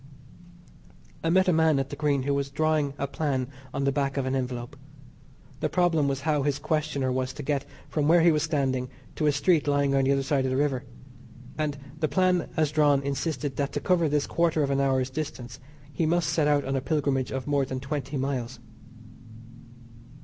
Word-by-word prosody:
I 165 Hz, -, +1 dB
met 185 Hz, +2 st, +4 dB
a 180 Hz, -, +4 dB
man 160 Hz, -2 st, +3 dB
at 135 Hz, 0 st, -2 dB
the -, -, -4 dB
Green 145 Hz, -3 st, +1 dB
who 140 Hz, +1 st, 0 dB
was 140 Hz, 0 st, -1 dB
drawing 150 Hz, -1 st, 0 dB
a 140 Hz, -, -1 dB
plan 140 Hz, -3 st, -2 dB, 0.2 s
on 140 Hz, -, -2 dB
the 140 Hz, -, +2 dB
back 140 Hz, -1 st, -1 dB
of 135 Hz, -, 0 dB
an 130 Hz, -, -1 dB
envelope. 125 Hz, 0 st, -4 dB, 0.8 s
The -, -, -1 dB
problem 170 Hz, -5 st, +2 dB
was 135 Hz, -1 st, -1 dB
how 150 Hz, -1 st, +1 dB
his 145 Hz, 0 st, 0 dB
questioner 150 Hz, -3 st, -1 dB
was 130 Hz, 0 st, -2 dB
to 145 Hz, -, -7 dB
get 140 Hz, -1 st, -1 dB, 0.2 s
from 150 Hz, -2 st, 0 dB
where 170 Hz, +2 st, +6 dB
he 170 Hz, +1 st, +6 dB
was 155 Hz, -1 st, +1 dB
standing 135 Hz, -5 st, 0 dB, 0.3 s
to 155 Hz, -, 0 dB
a -, -, +5 dB
street 150 Hz, +2 st, +2 dB
lying 140 Hz, -1 st, +2 dB
at 135 Hz, 0 st, +3 dB
the 135 Hz, -, +2 dB
other 135 Hz, 0 st, 0 dB
side 135 Hz, -1 st, +1 dB
of -, -, 0 dB
the 130 Hz, -, 0 dB
river, 140 Hz, -2 st, 0 dB, 0.7 s
and 150 Hz, -2 st, -2 dB, 0.2 s
the 155 Hz, -, +1 dB
plan 185 Hz, 0 st, +1 dB
as 155 Hz, -2 st, +2 dB
drawn 145 Hz, -2 st, +3 dB
insisted 140 Hz, -1 st, -2 dB
that 140 Hz, -1 st, -1 dB
to -, -, -1 dB
cover 170 Hz, -4 st, +2 dB
this 145 Hz, 0 st, +1 dB
quarter 165 Hz, -2 st, +1 dB
of 140 Hz, -, 0 dB
an 140 Hz, 0 st, +2 dB
hour's 130 Hz, -1 st, +1 dB
distance 130 Hz, -4 st, -6 dB, 0.3 s
he 160 Hz, +3 st, 0 dB
must 170 Hz, 0 st, +1 dB
set 155 Hz, -3 st, +2 dB
out 145 Hz, -1 st, +2 dB
on 135 Hz, +1 st, -1 dB
a 135 Hz, -, 0 dB
pilgrimage 135 Hz, -2 st, 0 dB
of 135 Hz, -1 st, -3 dB
more 145 Hz, -1 st, +1 dB
than 130 Hz, -1 st, -4 dB
twenty 140 Hz, 0 st, -4 dB
miles. 130 Hz, -3 st, -2 dB
140 Hz, 210 wpm, -27 LUFS, 135-155 Hz, 0.8 s, where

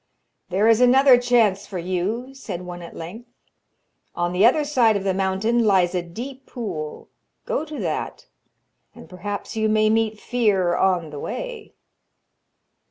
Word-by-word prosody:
'There 195 Hz, +4 st, +2 dB
is 225 Hz, +1 st, +5 dB
another 260 Hz, +1 st, +7 dB
chance 235 Hz, -5 st, +2 dB
for 195 Hz, -, -6 dB
you,' 185 Hz, +9 st, -3 dB
said 180 Hz, -9 st, -7 dB
one 175 Hz, 0 st, -8 dB
at 170 Hz, -, -10 dB
length. 215 Hz, +9 st, -9 dB, 0.9 s
'On 175 Hz, 0 st, -1 dB
the 185 Hz, +3 st, +2 dB
other 260 Hz, +7 st, +5 dB
side 240 Hz, -7 st, +3 dB
of 195 Hz, -, -5 dB
the 195 Hz, -1 st, 0 dB
mountain 195 Hz, +5 st, +1 dB
lies 190 Hz, -4 st, +3 dB
a 180 Hz, -, 0 dB
deep 250 Hz, +10 st, -9 dB
pool; 175 Hz, -, -6 dB, 0.4 s
go -, -, -1 dB
to 310 Hz, -1 st, -8 dB
that, -, -, -4 dB, 0.7 s
and -, -, -13 dB
perhaps 200 Hz, +4 st, -6 dB
you 220 Hz, -1 st, +1 dB
may 215 Hz, 0 st, +3 dB
meet 220 Hz, -1 st, 0 dB
fear 200 Hz, -9 st, +1 dB
on 175 Hz, -4 st, +1 dB
the 145 Hz, -, -7 dB
way.' 485 Hz, -, -6 dB
210 Hz, 155 wpm, -22 LUFS, 180-245 Hz, 0.9 s, another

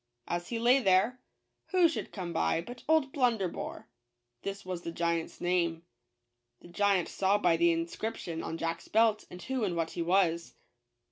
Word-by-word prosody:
As 175 Hz, 0 st, -2 dB
he 235 Hz, -, -2 dB
lay 245 Hz, +4 st, +5 dB
there, 205 Hz, +3 st, +3 dB, 0.5 s
who 365 Hz, -2 st, +5 dB
should 325 Hz, -, -4 dB
come 180 Hz, -4 st, -5 dB
by 80 Hz, -, +1 dB
but 240 Hz, +8 st, -8 dB
old 310 Hz, -4 st, +3 dB
Blunderbore, 230 Hz, -, -1 dB, 0.5 s
(this 200 Hz, 0 st, -5 dB
was 180 Hz, -2 st, -4 dB
the 170 Hz, -, -5 dB
giant's 170 Hz, -1 st, -2 dB
name). 170 Hz, -2 st, 0 dB, 0.8 s
The -, -, -14 dB
giant 195 Hz, 0 st, +2 dB
saw 195 Hz, +1 st, +2 dB
by 175 Hz, -4 st, +3 dB
the 170 Hz, +1 st, +4 dB
inscription 170 Hz, +1 st, -3 dB
on 165 Hz, -, -4 dB
Jack's 165 Hz, 0 st, -3 dB
belt 220 Hz, -1 st, +3 dB, 0.2 s
who 260 Hz, -3 st, -1 dB
and 185 Hz, -4 st, 0 dB
what 165 Hz, -1 st, -1 dB
he 170 Hz, -, -4 dB
was. 170 Hz, -1 st, +1 dB
185 Hz, 160 wpm, -30 LUFS, 170-225 Hz, 0.8 s, lay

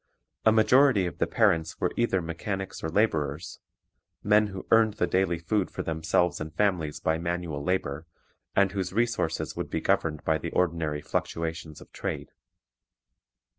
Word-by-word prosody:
A -, -, +8 dB
majority 115 Hz, -1 st, +5 dB
of 85 Hz, -, -5 dB
the -, -, +2 dB
parents 90 Hz, -8 st, +1 dB
were -, -, 0 dB
either 95 Hz, -7 st, +1 dB
mechanics 95 Hz, +4 st, -5 dB
or 80 Hz, -, -1 dB
laborers, 80 Hz, -5 st, 0 dB, 0.6 s
men 105 Hz, +1 st, +4 dB
who 95 Hz, -2 st, -7 dB
earned 110 Hz, -2 st, +5 dB
the 90 Hz, -, +1 dB
daily 90 Hz, -2 st, +1 dB
food 95 Hz, +4 st, -1 dB
for -, -, -5 dB
themselves 80 Hz, +2 st, 0 dB
and 80 Hz, 0 st, -5 dB
families 85 Hz, -4 st, 0 dB
by 80 Hz, 0 st, 0 dB
manual 85 Hz, -4 st, -3 dB
labor, 80 Hz, -3 st, -2 dB, 0.5 s
and 100 Hz, -1 st, +4 dB
whose 95 Hz, -2 st, -3 dB
resources 115 Hz, -7 st, -1 dB
would -, -, -4 dB
be -, -, -1 dB
governed 75 Hz, -2 st, 0 dB
by 80 Hz, -1 st, +1 dB
the 85 Hz, -, -4 dB
ordinary 80 Hz, -4 st, 0 dB
fluctuations 80 Hz, -2 st, -3 dB
of -, -, -15 dB
trade. -, -, -5 dB
85 Hz, 155 wpm, -27 LUFS, 80-100 Hz, 0.6 s, A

